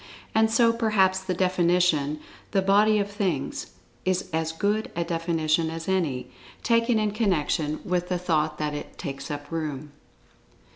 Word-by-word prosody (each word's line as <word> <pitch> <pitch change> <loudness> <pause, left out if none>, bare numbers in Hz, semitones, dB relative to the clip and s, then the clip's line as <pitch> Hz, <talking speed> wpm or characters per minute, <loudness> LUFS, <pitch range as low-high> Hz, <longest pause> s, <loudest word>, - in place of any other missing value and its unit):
And 220 0 +4
so, 230 0 +4
perhaps 210 -5 +2
the 190 -1 -3
definition 175 -5 +2 0.3
"The 195 - +3
Body 210 +2 +4
of 205 0 -1
Things," 185 - -2 0.4
is 185 0 -1
as 160 0 0
good 205 +6 0
a 170 - 0
definition 165 -1 0
as 165 0 -6
any, 160 -10 0 0.4
taken 230 0 +3
in 215 -1 +1
connection 160 -7 0
with 180 -1 -1
the 180 - +1
thought 155 -3 0
that 150 -1 -2
it 145 - -7
"takes 140 -5 -6
up 145 0 -6
room." 150 -3 -4
180 Hz, 150 wpm, -26 LUFS, 155-200 Hz, 0.4 s, And